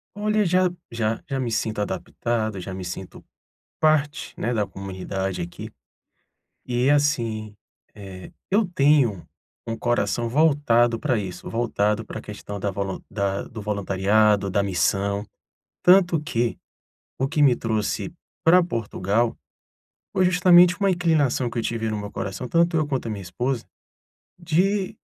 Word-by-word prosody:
Olha, 210 0 +1
já 180 +1 +3 0.2
já 115 -1 -2
já 135 -1 -1
me 125 - -1
sinto 110 -1 -1
adaptado, 110 +2 -2
já 95 +1 -6
me 95 0 -6
sinto 90 +1 -7 0.6
parte, 155 -1 +1
né, 120 - -1
da 105 -3 0
comunidade 95 0 -4
aqui. 85 0 -7 0.9
E 125 +2 +1
assim, 115 -8 +1 0.4
eh, 95 -3 -10 0.2
eu 210 +3 +3
tenho 140 - +2 0.4
um 115 0 -3
coração 120 0 0
voltado 120 -4 +3
para 130 -5 0
isso, 95 -3 -7
voltado 110 -2 0
para 110 - -8
a - - -6
questão 105 -1 -7
da 100 0 -1
volun 95 0 -3
da 100 -1 -1
do 110 -2 -9
voluntariado, 100 0 +2
da 100 +1 +1
missão. 100 +1 0 0.6
Tanto 180 -3 +5
que, 120 -5 -1 0.6
o 135 - +1
que 150 +2 +2
me 130 -4 +5
trouxe 110 +6 -2 0.3
para 180 +2 +6
Portugal, 115 - -1 0.8
foi 185 - +2
justamente 180 -1 +6
uma 200 -1 +3
inclinação 155 -8 +1
que 115 0 -3
eu - - -2
tive 110 -1 -2
no 110 - -2
meu 100 0 -6
coração, 100 +6 -5
tanto 170 +3 +2
eu 155 -2 +1
quanto 135 -4 -2
a - - -2
minha 100 -2 -5
esposa, 120 +8 -3 0.7
de 185 +4 0
115 Hz, 145 wpm, -24 LUFS, 100-150 Hz, 0.9 s, para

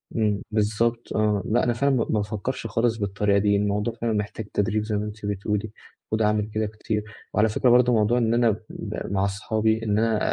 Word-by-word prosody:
إمم، 105 -3 +1
بالضبط 110 +2 0
آه، 105 -2 +1
لأ 120 +2 +2
أنا 120 - +2
فعلًا 140 +4 +1
ما 115 - +2
ما 110 - +2
بافكرش 110 +4 -3
خالص 115 +1 +1
بالطريقة 100 -1 +1
دي، 100 0 +3
الموضوع 105 +2 0
فعلًا 115 0 -2
محتاج 105 +1 -3
تدريب 105 +1 +1
زي 105 0 -2
ما 105 - -2
أنتِ 105 0 -7
بتقولي، 105 +1 -2 0.4
وده 110 -1 +2
عامِل 105 0 +1
كده 110 0 0
كتير، 105 0 -3 0.3
وعلى 110 +1 +3
فكرة 125 +4 +2
برضه 125 0 +5
موضوع 110 +2 +3
إن 115 -2 +2
أنا 120 -1 +4 0.2
ب - - -6
مع 95 0 +1
صحابي 110 +3 0
إن 105 -2 +1
أنا، 110 -1 +2
110 Hz, 205 wpm, -25 LUFS, 105-115 Hz, 0.4 s, برضه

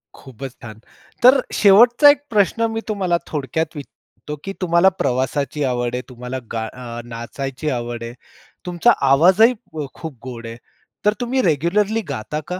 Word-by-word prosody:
खूपच 130 0 -9
छान! 110 -3 -10 0.4
तर 260 +2 +7
शेवटचा 240 +8 +6
1 285 0 +4
प्रश्न 215 +1 +2
मी 225 0 -3
तुम्हाला 190 -5 0
थोडक्यात 155 +3 -3
विचारतो, 150 +1 -10
की 195 - -5
तुम्हाला 170 +1 +4
प्रवासाची 135 +3 -1
आवड 125 -2 -1
आहे, 125 - -2
तुम्हाला 125 +1 -6
गा 115 -1 -2
अ, 120 0 -8
नाचायची 125 +5 -5
आवड 120 -2 -4
आहे, 115 0 -7 0.5
तुमचा 180 +6 +3 0.2
आवाजही 185 - +5 0.4
खूप 160 -6 -8
गोड 120 -3 -8
आहे, 115 +1 -8 0.5
तर 210 - +4
तुम्ही 255 +2 0
रेग्युलरली 195 - +1
गाता 135 +3 -4
का? 180 +1 -4
150 Hz, 150 wpm, -20 LUFS, 125-195 Hz, 0.5 s, तर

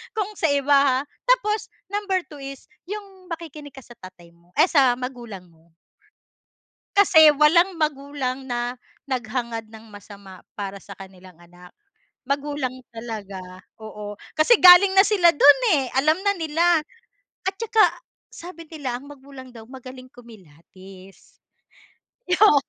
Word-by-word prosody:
kung 425 -1 -2
sa - - -1
iba 280 0 +2
ha. 275 -2 +3 0.3
Tapos 470 -4 +1 0.2
number 405 -2 -1
2 295 - -11
is 275 +1 -10 0.2
yung 395 -3 -9
makikinig 305 -4 -10
ka 270 - -12
sa 240 -1 -17
tatay 180 -4 -14
mo, 170 +1 -29
ay 315 +5 +4
sa 270 -6 +4
magulang 240 -8 -8
mo. 165 0 -28 1.2
Kasi 320 -6 +7
walang 340 +4 +3
magulang 280 -3 -3
na 240 0 -3 0.4
naghangad 235 -2 -4
ng 220 0 -14
masama 200 -2 -13 0.2
para 200 -1 -6
sa 200 - -13
kanilang 185 -2 -14
anak. 175 +1 -17 0.6
Magulang 280 -1 -3 0.2
talaga, 215 -4 -7 0.4
oo. 210 -1 -8 0.2
Kasi 310 +10 +5
galing 370 +2 +8
na 385 - +7
sila 375 -6 +4
dun 290 - +6 0.2
eh, 260 -2 -5
alam 310 +3 +3
na 405 - +2
nila. 330 +1 +2 0.7
At 385 - -12
tsaka, 445 0 +1 0.5
sabi 335 -2 -12
nila, 275 -7 -5
ang 285 - -14
magulang 270 -2 -13
daw 225 -2 -13
magaling 255 0 -12
kumilatis. 190 -3 -17 1.0
Oo. 395 -10 +6
265 Hz, 135 wpm, -22 LUFS, 215-325 Hz, 1.2 s, galing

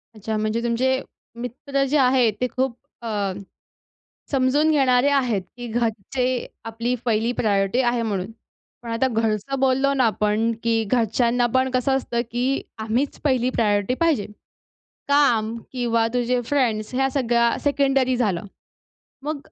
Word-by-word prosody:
अच्छा 215 +1 -3
म्हणजे 215 +2 -1
तुमचे 260 +3 +1 0.4
मित्र 275 +3 -2
जे 300 - +2
आहे 255 -3 +4
ते 250 - +2
खूप 260 -2 0 0.3
अ, 235 - -6 1.2
समजून 280 +3 +2
घेणारे 265 -3 +3
आहेत, 250 -8 +1
की 245 0 -7
घरचे 230 +1 -1 0.4
आपली 230 +2 -2
पहिली 230 0 +1
प्रायोरिटी 200 0 +1
आहे 240 -2 +1
म्हणून. 200 -3 -2 0.5
पण 235 - -7
आता 230 +3 +1
घरचं 225 +3 -1
बोललो 270 +1 +2
ना 260 -2 +2
आपण, 215 +1 +1
की 230 -1 +1
घरच्यांना 240 +2 +1
पण 260 0 +2
कसं 260 +2 +2
असतं, 240 -3 -2
की 255 +3 0 0.2
आम्हीच 225 +6 -1
पहिली 255 -3 +2
प्रायोरिटी 205 -1 +1
पाहिजे. 320 -11 +2 0.8
काम 240 -6 +3 0.2
किंवा 235 -3 +1
तुझे 245 0 +1
फ्रेंड्स 235 -4 0
ह्या 270 +1 +2
सगळ्या 235 -3 +2
सेकेंडरी 270 -3 +2
झालं, 205 -8 0 0.8
मग 300 +1 -3
245 Hz, 135 wpm, -23 LUFS, 225-265 Hz, 1.2 s, आहे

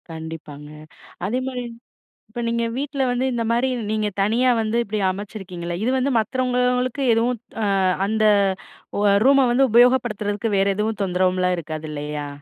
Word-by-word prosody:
கண்டிப்பாங்க. 160 -2 -8 0.6
அதேமாரி, 250 +4 -2 0.7
இப்ப 240 +2 -5
நீங்க 235 0 0
வீட்ல 275 0 -2
வந்து, 245 +1 0
இந்த 235 -1 -1
மாரி 240 +3 +1 0.2
நீங்க 215 -1 0
தனியா 230 +6 +2
வந்து 220 +1 -1
இப்படி 215 0 -3
அமைச்சிருக்கீங்கள்ல. 185 -4 -6
இது 245 - +1
வந்து 265 +2 0
மத்தவங்களுக்கு 250 +2 0
எதுவும் 235 +1 0 0.2
ஆ - - +1 0.4
அந்த 215 +1 +1 1.0
ரூமை 275 0 +5
வந்து 270 +2 +4
உபயோகப்படுத்துறதுக்கு 225 -4 +2
வேறு 195 +1 +2
எதுவும் 215 0 -1
தொந்தரவும்லாம் 185 0 +1
இருக்காது, 155 -1 -6
இல்லையா? 150 0 -5
220 Hz, 130 wpm, -22 LUFS, 185-250 Hz, 1.0 s, ரூமை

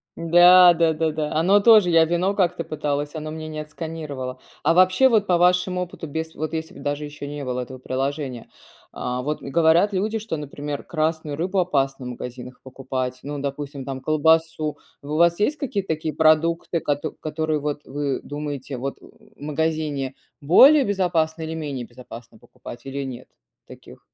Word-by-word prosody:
Да, 175 +2 +7
да-да-да, 160 -2 0
оно 185 +6 +4
тоже, 210 -4 +6
я 165 -1 +6
вино 175 +4 0
как-то 180 -3 0
пыталась, 145 -2 -3
оно 155 -1 -5
мне 155 0 -6
не 155 0 -6
отсканировало. 150 -5 -6 0.2
А - - +4
вообще 185 +9 +5
вот, 215 -4 +2
по 175 -1 +3
вашему 180 +1 +2
опыту, 175 -2 -6
без 160 +2 -5
вот, 155 0 -5
если 160 0 -4
б - - -12
даже 145 +1 -3
еще 145 -1 -8
не 145 -1 -6
было 125 0 -2
этого 130 +1 -8
приложения, 135 -1 -4 0.4
а, 125 0 -4
вот 150 +4 -3
говорят 165 +7 +3
люди, 215 +4 -1
что, 220 -5 -4
например, 145 0 -6
красную 155 -2 -2
рыбу 185 +3 -1
опасно 135 -7 0
в - - -5
магазинах 125 +1 -8
покупать, 130 -1 -4
ну, 145 +1 -6
допустим, 140 0 -5
там 135 -1 -5
колбасу, 155 +1 +1 0.3
у - - -11
вас 170 +1 +4
есть 285 +9 +1
какие-то 205 -10 -3
такие 155 0 -4
продукты, 165 +2 +2
кото 145 0 -2
которые 155 0 -3
вот, 145 0 -3
вы 140 0 -2
думаете, 145 -2 -5
вот 135 +3 -4
в - - -21
магазине 150 -2 -2 0.3
более 270 - +7
безопасно 170 -6 0
или 160 - -4
менее 145 -6 -5
безопасно 120 -2 -13
покупать, 120 +1 -12
или 140 +1 -4
нет 130 -2 -8 0.4
таких? - - -14
155 Hz, 165 wpm, -23 LUFS, 140-170 Hz, 0.4 s, Да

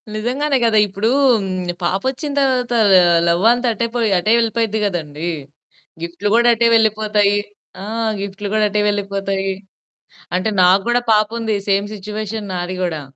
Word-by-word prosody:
నిజంగానే 265 +6 -1
గదా! 220 -2 +3
ఇప్పుడు 200 +4 -2 0.7
పాపొచ్చిన 260 - -2
తరువాత 250 -2 0 0.5
లవ్ 170 +3 +1
అంతా 245 0 -1
అటే 230 +3 -2
పొయి, 230 -3 +1
అటే 210 +5 0
వెళ్ళిపోయిద్ది 225 -1 -1
గదండీ! 165 -3 -4 0.7
గిఫ్ట్లు 175 +5 -3
గూడా, 240 +1 +4
అటే 235 +1 +2
వెళ్ళిపోతాయి. 215 -2 +2 0.5
ఆ! - - -6 0.4
గిఫ్ట్లు 200 +1 -5
గూడా 215 0 +2
అటే 210 +1 0
వెళ్ళిపోతాయి. 195 -1 -2 0.9
అంటే 185 +4 -1
నాకు 185 +2 +4
కూడా 245 +1 +2
పాపుంది. 220 +1 0
సేమ్ 200 +1 +1
సిట్యుయేషన్ 210 +1 -6
నాది 180 +1 -4
గుడా. 160 -4 -3
210 Hz, 130 wpm, -18 LUFS, 195-230 Hz, 0.9 s, గూడా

